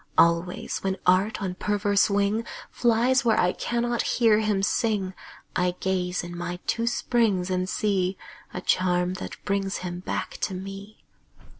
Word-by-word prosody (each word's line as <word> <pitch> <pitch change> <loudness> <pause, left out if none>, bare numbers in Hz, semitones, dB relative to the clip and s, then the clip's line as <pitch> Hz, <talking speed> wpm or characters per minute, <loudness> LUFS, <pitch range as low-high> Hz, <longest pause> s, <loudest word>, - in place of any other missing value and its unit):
Always, 170 +2 +2
when 190 0 -2
Art 190 +4 +3
on 185 -2 -2
perverse 205 +2 +2
wing 205 +2 +1 0.3
Flies 240 +2 +3
where 225 -3 +3
I 180 - +3
cannot 240 0 -1
hear 225 -3 +3
him 210 -3 +1
sing, 200 -3 0 0.4
I 180 0 +1
gaze 180 -1 -1
in 175 0 -7
my 175 0 -4
two 230 0 0
springs 215 -7 +1
and 185 0 0
see 190 -3 0 0.3
A 180 - -5
charm 180 -1 +1
that - - -6
brings 195 -1 0
him 175 0 -4
back 180 - -4
to 190 - -1
me. 195 +3 -8
195 Hz, 150 wpm, -26 LUFS, 180-215 Hz, 0.4 s, Art